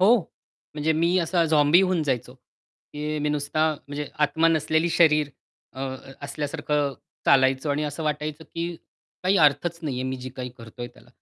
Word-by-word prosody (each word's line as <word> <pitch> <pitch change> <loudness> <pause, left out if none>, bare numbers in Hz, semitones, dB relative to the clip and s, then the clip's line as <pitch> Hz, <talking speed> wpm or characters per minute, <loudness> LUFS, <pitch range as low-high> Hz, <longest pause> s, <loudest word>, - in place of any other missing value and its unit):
हो. 215 +6 +7 0.6
म्हणजे 155 +1 +1
मी 170 +3 +2
असा 170 0 +2
झॉम्बी 155 +1 +5
होऊन 185 -3 +1
जायचो. 130 -3 -2
की 150 +4 -8
मी 150 0 0
नुसता 150 +2 +1 0.2
म्हणजे 145 0 -4 0.2
आत्मा 160 +3 +2
नसलेली 160 +1 +2
शरीर 150 -3 +4 0.5
अ, 130 - -7 0.4
असल्यासारखं 145 0 -1 0.3
चालायचो 130 +1 +4
आणि 145 +2 0
असं 145 +2 -4
वाटायचं 150 +1 -3
की 170 +1 -4 0.5
काही 185 +2 +3
अर्थच 155 +4 +2
नाहीये 130 -5 -2
मी 130 0 -2
जी 130 0 -7
काही 125 -1 -5
करतोय 115 +1 -8
त्याला. 120 - -20
150 Hz, 155 wpm, -25 LUFS, 140-160 Hz, 0.6 s, हो